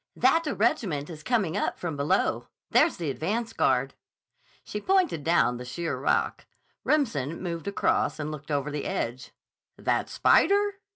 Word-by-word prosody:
"—that 330 0 +3
a 295 - -1
regiment 180 -9 0
is 155 -2 -9
coming 200 -4 0
up 205 - -1
from 165 -4 -4
below. 140 +1 0 0.2
There's - - +4
the 160 -5 -2
advance 220 - -2
guard." - - +1 0.7
She 210 - -5
pointed 370 - +1
down 160 -7 +2
the 125 - -7
sheer 165 +7 -3
rock. - - 0 0.4
Remsen 165 - 0
moved 170 0 -5
across 200 - +1
and 155 0 -4
looked 150 0 -9
over 145 0 -1
the 145 -1 -4
edge. 125 +3 -3 0.5
"That - - 0
spider?" 405 0 +3
170 Hz, 155 wpm, -27 LUFS, 145-230 Hz, 0.7 s, There's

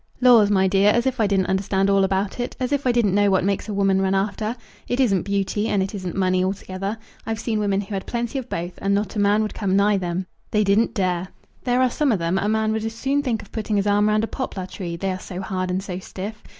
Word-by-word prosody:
"Laws, 240 -5 +6
my 190 -2 +3
dear, 195 +2 +4
as 235 +3 +2
if 260 -2 -1
I 215 - +3
didn't 195 -2 +2
understand 190 +1 +1
all 195 -1 +4
about 190 +3 -1
it; 245 - -3
as 255 0 -2
if 285 -2 0
I - - +5
didn't 235 -5 +2
know 205 0 +4
what 190 -2 +2
makes 200 +2 -1
a - - -2
woman 195 -1 +2
run 190 0 +1
after? 210 +3 -1 0.3
It 245 - -1
isn't 200 -9 +3
beauty, 200 +2 -1
and 195 -3 +1
it 190 - -5
isn't 185 -4 -5
money 185 -1 +2
altogether. 195 +2 -3 0.3
I've 225 -1 -2
seen 220 -3 -1
women 200 -1 +1
who 205 +1 -8
had 190 -1 -4
plenty 240 +2 -2
of 255 -1 -9
both, 175 +1 -3
and 200 0 +1
not 205 +1 -2
a - - -1
man 205 +1 +3
would 215 - -3
come 195 -3 0
nigh 200 +1 +4
them. 180 0 -2 0.2
They 210 0 +2
didn't 205 +3 +2
dare. 185 -2 0 0.4
There 250 0 +3
are 255 - +2
some 290 0 +1
of 215 - +2
them, 170 +2 0
a 205 - 0
man 220 0 +1
would 220 0 -1
as 225 0 -3
soon 275 +4 0
think 240 -6 -2
of 200 - -17
putting 215 -1 -2
his 200 0 +1
arm 205 +1 +3
round 215 +1 +2
a - - 0
poplar 205 -9 -4
tree, 180 -2 -6
they 190 +3 -2
are 185 - -4
so 185 -1 -7
hard 185 -1 -3
and 185 +1 -1
so 185 -2 -5
stiff. 205 +4 -7
200 Hz, 270 wpm, -23 LUFS, 190-220 Hz, 0.4 s, Laws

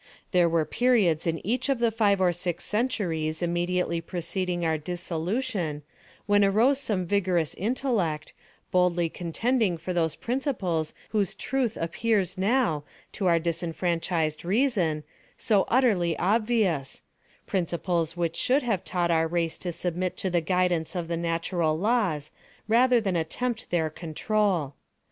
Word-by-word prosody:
There 175 -2 +4
were 165 -1 +2
periods 195 - +2
in 165 0 -2
each 245 +7 0
of 275 - +2
the 235 -1 +2
five 210 -3 +2
or 180 -2 +3
six 175 0 -3
centuries 180 -9 -1
immediately 175 0 0
preceding 175 +1 -3
our 160 -1 +2
dissolution, 175 - -3 0.4
when 205 0 +4
arose 225 +8 +4
some 200 -8 -1
vigorous 180 -4 +1
intellect, 200 - -1 0.4
boldly 175 -2 +2
contending 190 +4 0
for 175 +3 -4
those 165 -3 0
principles 220 - -2
whose 205 -4 0
truth 255 -4 -1
appears 190 +2 0
now, 195 - +1 0.3
to 195 - -2
our 170 -1 +5
disenfranchised 165 -1 -1
reason, 185 - +1 0.3
so 205 -4 +2
utterly 205 -10 +2
obvious—principles 180 - -1
which 170 -1 -1
should 270 +3 +2
have 215 -7 0
taught 175 -1 0
our 165 -1 +3
race 165 -1 -1
to 180 - -3
submit 180 +2 -2
to 190 - -2
the 175 -1 +2
guidance 180 -1 0
of 170 -2 -3
the 170 - -1
natural 165 -1 0
laws, 185 -8 0 0.4
rather 245 +2 +5
than 195 -5 -1
attempt 220 +8 -2
their 160 -3 0
control. 170 -1 -1
180 Hz, 135 wpm, -27 LUFS, 165-215 Hz, 0.4 s, our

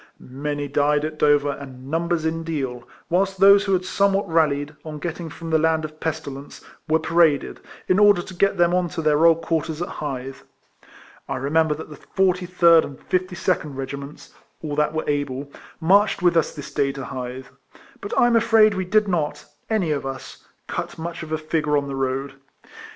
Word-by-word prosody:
Many 145 +2 -5
died 145 +1 +1
at 155 0 -6
Dover 145 -1 +3
and 135 -1 -10
numbers 165 0 0
in 165 +1 -1
Deal; 130 -7 -4 0.2
whilst 195 +2 0
those 200 +1 +7
who 195 - +1
had 185 0 +1
somewhat 200 +1 +1
rallied, 150 -3 +1
on 155 -1 -7
getting 165 +1 -5
from 165 +2 -8
the 160 - +4
land 160 0 +1
of 155 0 -10
pesti 155 -3 -3
lence, 140 +1 -11 0.3
were 160 0 +3
paraded, 165 -3 +2 0.3
in 185 - +3
order 205 -4 +5
to 185 - -10
get 195 +3 +1
them 175 0 +3
on 180 -1 +1
to 165 +1 -5
their 155 0 +3
old 165 0 +3
quarters 160 -1 -2
at 175 - -2
Hythe. 135 -2 -5 0.9
I - - -2
remember 150 +3 +1
that 155 0 -9
the 150 - -10
43 180 -1 0
rd - - +2
and 135 - -11
52nd 180 -5 -1
Kegiments 140 +2 -7 0.3
(all 150 -2 -3
that 150 0 +1
were 155 - -2
able) 145 -1 -2 0.3
marched 195 +3 +3
with 175 -1 +4
us 165 - +1
this 145 - -9
day 140 -2 +1
to 135 -1 -6
Hythe; 130 +1 -6 0.6
but 200 - -6
I'm 240 -1 +4
afraid 225 -2 +5
we 190 -1 -2
did 210 +3 +2
not 165 -6 -2 0.2
(any 205 -8 +1
of 145 - -1
us) 135 -1 -9 0.2
cut - - -5
much 170 +1 -6
of 155 -1 -8
a 155 - 0
figure 155 -1 0
on 140 -1 -1
the 140 - -5
road. 135 +1 -2
160 Hz, 190 wpm, -22 LUFS, 145-175 Hz, 0.9 s, those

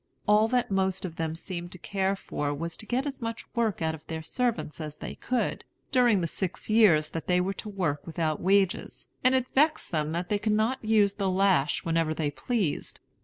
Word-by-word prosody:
All 210 +1 +5
that 245 -2 0
most 190 0 0
of 165 -3 -7
them 160 -1 -2
seemed 175 0 -6
to - - -9
care 195 +2 -1
for 145 -6 -3
was 165 +2 -4
to 215 - -8
get 255 +3 0
as 275 -2 -5
much 230 -1 -4
work 225 -7 0
out 160 0 +1
of 160 -1 -9
their 160 -1 -4
servants 235 -6 -2
as 150 -1 -6
they - - -7
could, 250 -1 -2 0.3
during 240 -7 +4
the - - 0
six 185 +5 -4
years 180 -9 +5
that 165 - -5
they 180 0 +3
were 185 +2 0
to 210 - -7
work 175 -8 -2
without 160 -2 -1
wages, 195 0 +1 0.2
and 255 +1 +5
it 260 -1 +2
vexed 305 +3 +2
them 155 -2 0
that 175 +1 -2
they 205 - +1
could 215 +1 +1
not 220 +5 +1
use 215 -2 +3
the 200 -2 -1
lash 185 -6 +2
whenever 165 -1 +1
they 150 -2 -1
pleased. 205 - -2
190 Hz, 215 wpm, -28 LUFS, 165-220 Hz, 0.3 s, All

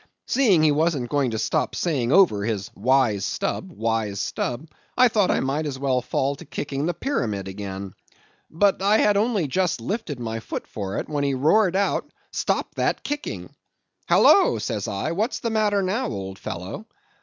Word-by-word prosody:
Seeing 215 - +3
he 155 - +5
wasn't 145 -5 0
going 140 -3 +2
to 110 - -3
stop - - -1
saying 135 -8 0
over 150 - +5
his 105 -3 -3
'wise 120 -3 +2
Stubb, 190 - -3
wise 110 - -1
Stubb,' 125 +7 -3 0.3
I 250 0 +7
thought 210 -5 +2
I - - +2
might 145 +4 -1
as 135 -2 -4
well 130 -2 0
fall 135 +3 -1
to 175 - -10
kicking 140 +1 -3
the 175 - -1
pyramid 105 - -2
again. 95 -1 -6 0.6
But 195 +4 +2
I 205 +2 +4
had 210 -1 +3
only 210 -4 +1
just 180 +2 0
lifted 150 - -4
my 115 -1 -3
foot - - -6
for 100 -2 -5
it, - - -3
when 145 -2 -2
he 140 -1 +1
roared 180 +8 +3
out, 200 +1 0 0.2
'Stop - - -1
that - - 0
kicking!' 105 - -5 0.6
'Halloa,' - - +5
says 105 -2 -3
I, 100 +10 -2
'what's 215 +9 -1
the 230 - -3
matter 210 -2 +2
now, 220 +8 -1
old 95 - -6
fellow? 95 - -6
145 Hz, 180 wpm, -24 LUFS, -, 0.6 s, I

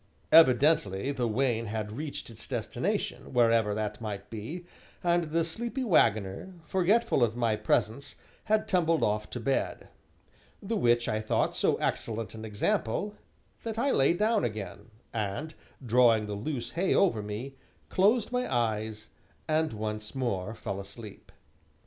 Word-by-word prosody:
Evidently 135 -6 +5
the 125 -4 -1
wain 115 0 0
had 105 0 -3
reached 140 0 -6
its 110 -1 -10
destination, - - -3
wherever 115 -3 +3
that 105 0 -3
might 105 -2 -6
be, 130 +12 -6 0.4
and 175 -1 +2
the 165 +1 0
sleepy 235 +10 -3
wagoner, 115 - +2
forgetful 190 - +2
of 115 -1 +1
my 115 -3 +1
presence, 110 +4 -1 0.3
had 215 0 +1
tumbled 165 -3 +2
off 105 0 0
to 120 - -5
bed. 135 +4 -1 0.7
The 225 +3 -3
which 120 - +3
I 110 0 0
thought 110 - 0
so - - +2
excellent 115 -3 -2
an 110 0 -7
example 110 - -1 0.5
that 225 -1 -5
I 275 +4 +2
lay 135 +4 +4
down 215 +4 +2
again, 105 -1 -5 0.2
and, 110 +9 -3 0.3
drawing 115 -2 +4
the 105 - -4
loose 120 +4 -4
hay 180 +3 +1
over 170 - +3
me, 105 +6 -5 0.4
closed 215 +5 +3
my 250 0 -1
eyes, 110 -3 -1 0.4
and 155 0 +1
once 105 0 -5
more 110 -5 -2
fell 100 -3 -5
asleep. 100 +1 -10
120 Hz, 145 wpm, -29 LUFS, 105-165 Hz, 0.7 s, Evidently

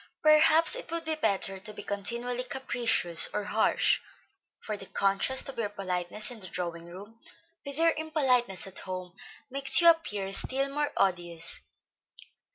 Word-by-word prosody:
Perhaps 310 +4 +5
it - - -7
would 335 0 -3
be 320 - -1
better 200 -9 0
to 210 +2 -8
be - - -8
continually 235 +5 -2
capricious 240 -9 0
or 210 - -1
harsh, 220 +2 +1 0.6
for 215 - -5
the 195 -1 -9
contrast 200 +7 -1
of 275 - -7
your 215 -3 -1
politeness 195 +1 -3
in 240 - -9
the 185 - -6
drawing 170 -2 -5
room 200 +6 -12 0.4
with 280 -1 -7
your 330 +1 +4
impoliteness 265 - 0
at 195 - -4
home 185 -1 -7 0.4
makes 275 0 +5
you 340 - +5
appear 210 -13 +2
still 275 +5 +2
more 295 0 -1
odious. 175 -3 +1
220 Hz, 155 wpm, -28 LUFS, 190-275 Hz, 0.6 s, Perhaps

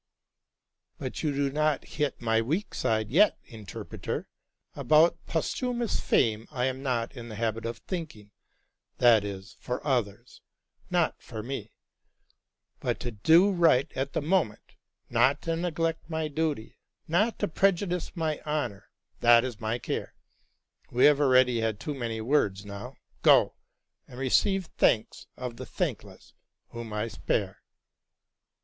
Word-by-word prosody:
'' - - -56
But - - -5
you 150 - 0
do 140 0 0
not 150 0 +1
hit 150 -2 -2
my 115 -1 +2
weak 160 - -2
side 110 -1 0
yet, 195 +8 +5
interpreter. 110 -5 -6 0.5
About 155 +2 +4
posthumous 240 +7 -1
fame 110 -2 +1
I 125 -4 -1
am 130 0 -2
not 125 -2 -2
in 120 -2 -8
the 110 - -7
habit 115 +1 -2
of 115 0 -5
thinking; 150 - -7 0.7
that 115 -4 +6
is 100 +1 -7
for 125 - -3
others, 120 -3 -2 0.5
not 175 -3 +1
for 110 -4 -7
me: 120 -3 -6 1.0
but - - -2
to 120 - -3
do 165 - +5
right 165 -6 +3
at 135 +1 -2
the - - -1
moment, 160 - 0 0.3
not - - +3
to 165 - -1
neglect 165 -1 -2
my 160 -1 -1
duty, 150 -6 -3 0.3
not 205 +8 +2
to 205 - 0
prejudice 180 0 0
my 160 -3 -2
honor, 125 -10 -3 0.2
— - - -41
that 120 0 +6
is 120 -4 -6
my 110 +2 -1
care. - - -4 0.7
We 125 +1 +4
have 150 -1 +5
already 130 -3 +4
had 110 -2 -1
too 150 - -4
many 115 -4 -4
words; 105 -6 +1
now 100 0 -8 0.3
go - - +5 0.3
— - - -52
and 125 - -12
receive 190 - +2
the 160 - -21
thanks 110 -1 +2
of 125 -2 -6
the - - -6
thankless, - - -4 0.4
whom 115 -1 -7
I 105 +2 -2
spare." - - -2
130 Hz, 150 wpm, -28 LUFS, 115-160 Hz, 1.0 s, that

